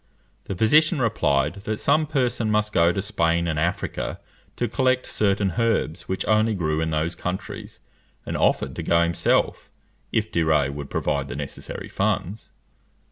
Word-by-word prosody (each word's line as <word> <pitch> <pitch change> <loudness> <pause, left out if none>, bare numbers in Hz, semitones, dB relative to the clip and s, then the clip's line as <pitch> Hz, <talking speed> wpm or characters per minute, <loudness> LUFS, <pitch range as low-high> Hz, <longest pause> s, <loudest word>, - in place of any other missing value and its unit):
The 95 - -4
physician 150 - +4
replied, 95 - +1
that 110 0 -2
some 155 0 +2
person 125 -6 0
must 105 0 +1
go 85 +1 +4
to 95 0 -2
Spain 85 -4 +1
and 80 -2 -1
Africa 85 +3 -2 0.4
to 120 - -1
collect 130 +2 +1
certain 100 -3 +1
herbs 115 -7 0
which 95 - -2
only 110 0 +3
grew 80 -3 0
in 80 - 0
those 80 +2 -1
countries, 90 +1 -6 0.5
and - - -4
offered 65 -1 +1
to - - -2
go 85 0 +3
himself, 85 0 +1 0.4
if 110 -1 0
De 85 - +1
Rays 75 -4 +2
would 70 0 -7
provide 70 -1 -1
the 65 - -6
necessary 70 -1 -6
funds. 105 +5 -2
95 Hz, 160 wpm, -24 LUFS, 80-110 Hz, 0.5 s, physician